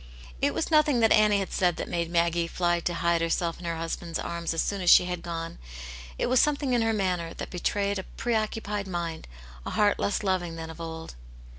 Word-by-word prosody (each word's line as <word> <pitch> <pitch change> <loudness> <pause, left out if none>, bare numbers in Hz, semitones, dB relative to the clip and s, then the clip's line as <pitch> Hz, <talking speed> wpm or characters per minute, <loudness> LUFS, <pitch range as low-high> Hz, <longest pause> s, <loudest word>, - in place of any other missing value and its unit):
It - - +1
was 325 - -2
nothing 300 -5 +4
that 225 - +4
Annie 210 -1 +5
had 195 -1 -3
said 180 -2 +2
that - - -5
made 170 -1 -2
Maggie 170 0 +1
fly 175 0 +1
to 175 +1 -2
hide 170 0 +1
her$elf 165 0 -1
in 175 - -9
her 170 -1 -2
husband's 165 0 -4
arms 170 0 -3
as 165 - 0
soon 200 -1 -2
as 180 - +2
she - - +8
had 180 -1 -3
gone; 165 -1 -5 0.6
it - - 0
was 255 0 +3
something 285 -2 +2
in 240 - +3
her 225 0 +2
manner 180 -5 -1
that - - -6
betrayed 200 +2 -1
a - - -5
preoccupied 215 -3 -1
mind, 170 -3 -4 0.4
a - - -5
heart 205 -1 +2
less 200 - 0
loving 180 -4 -1
than 165 0 -6
of 160 - -10
old. 160 0 -6
175 Hz, 220 wpm, -27 LUFS, 170-205 Hz, 0.6 s, she